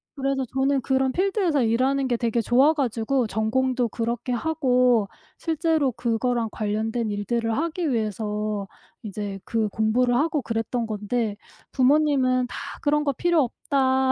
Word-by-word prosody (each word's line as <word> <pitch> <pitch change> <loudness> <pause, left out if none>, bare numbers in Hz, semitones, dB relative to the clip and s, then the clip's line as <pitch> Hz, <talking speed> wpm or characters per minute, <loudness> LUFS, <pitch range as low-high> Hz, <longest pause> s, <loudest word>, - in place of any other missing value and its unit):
그래서 270 -1 -1
저는 270 0 +1
그런 265 +1 +1
필드에서 370 - +1
일하는 260 +4 +1
게 240 -2 0
되게 235 -1 0
좋아 265 +7 +4
가지고 245 -2 0
전공도 240 +3 0
그렇게 235 +2 -3
하고 250 -6 +2 0.3
실제로 320 -4 +1
그거랑 235 0 -1
관련된 220 +1 -2
일들을 225 +2 -1
하기 325 0 -1
위해서 210 -2 -2 0.4
이제 200 -1 -5
그 225 -2 0
공부를 240 +4 +1
하고 300 +1 +1
그랬던 230 0 -2
건데 215 0 -2 0.4
부모님은 260 -2 +3
"다 - - -9 0.3
그런 295 +1 +2
거 280 -2 0
필요 340 0 +2
없다. 265 +1 +1
250 Hz, 305 characters per minute, -24 LUFS, 225-275 Hz, 0.4 s, 좋아